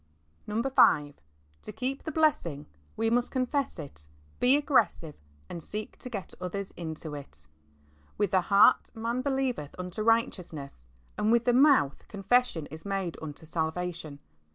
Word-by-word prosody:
V. 215 +2 -1 1.0
To - - -8
keep 265 +2 -3
the 315 - -5
blessings 280 - +1 0.3
we 225 0 +1
must 245 +1 +2
confess 260 +2 -1
it^ 140 - -6 0.3
be 265 +4 +5
aggressive^ 260 - +1 0.3
and 170 - -7
seek 210 +6 -5
to 250 - -7
get 200 -6 -6
others 195 +2 -4
into 160 -2 -6
it, 75 - -10 0.4
" 75 0 -32
With 205 -3 +1
the 190 -2 +4
heart 200 +6 +5
man 230 +3 -2
believeth 265 - -2
unto 180 +3 -5
righteousness, 180 - -1 0.4
and 215 - +2
with 235 0 +3
the 245 - +4
mouth 265 - +4
confession 200 -4 +1
is 160 +1 -8
made 195 -4 -2
unto 155 0 -6
salvation." 160 -1 -3
195 Hz, 145 wpm, -29 LUFS, 160-245 Hz, 1.0 s, be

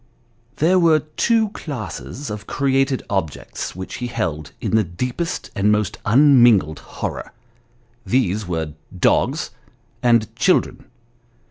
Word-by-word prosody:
There 180 +5 +3
were 160 -3 +4
two 225 -2 +2
classes 140 - -6
of 105 -1 -7
created 135 -1 +1
objects 95 -8 -4
which 95 +1 -6
he 125 - -3
held 80 -11 -3
in - - -1
the 110 - +4
deepest 125 - -4
and 105 0 +2
most 105 -1 0
unmingled 120 - +5
horror; - - -6 0.7
these 110 -5 0
were 80 -4 -3 0.2
dogs, - - +1 0.5
and 115 -3 +2
children. - - +1
115 Hz, 115 wpm, -21 LUFS, 95-140 Hz, 0.7 s, unmingled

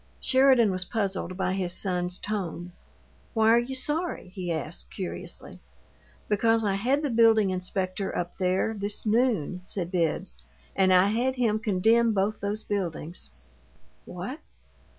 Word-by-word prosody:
Sheridan 260 -5 +4
was 185 0 0
puzzled 190 -3 -3
by 190 -1 0
his 185 -2 -2
son's 180 -2 -2
tone. 180 -4 -4 0.6
"Why 220 0 +4
are 235 - +6
you 255 +3 -3
'sorry'?" 300 - -1
he 180 -2 -5
asked, 140 - -4
curiously. - - -7 0.7
"Because 225 +2 +2
I 200 - +1
had 255 +9 +1
the 290 - 0
building 225 -3 +5
inspector 185 +1 -2
up 175 0 -4
there, 185 +4 +1
this 205 0 -3
noon," 215 - +1
said 180 -2 -3
Bibbs, 160 - -1 0.4
"and 190 -1 +3
I 185 +2 +5
had 245 +5 0
him 225 -4 +1
condemn 225 +2 +3
both 200 +2 0
those 205 +2 -3
buildings." 175 -4 -4 0.8
"What?" 185 - -6
200 Hz, 140 wpm, -27 LUFS, 180-230 Hz, 0.8 s, are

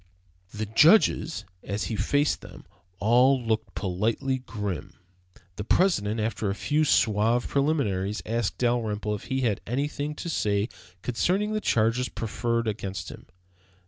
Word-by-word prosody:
The 110 +1 -3
judges, 155 - +4 0.2
as 100 -1 -3
he 100 +5 -3
faced 145 +6 +1
them, - - -12 0.3
all 125 +6 +4
looked 115 -2 -2
politely 110 +8 -1
grim. 105 -10 -5 0.6
The 105 - -3
President, 110 - +2
after 110 -1 -1
a 100 - -1
few 150 +7 +1
suave 115 -1 +2
preliminaries, 110 -9 0
asked 115 -1 -1
Dalrymple 110 -4 0
if 105 - -6
he 130 0 -1
had 110 -6 0
anything 145 +4 -2
to 170 - -6
say 105 -8 0 0.3
concerning 190 - 0
the 215 - -1
charges 115 - +1
preferred 115 +1 -2
against 100 -2 -4
him. - - -11
115 Hz, 135 wpm, -26 LUFS, 105-135 Hz, 0.6 s, judges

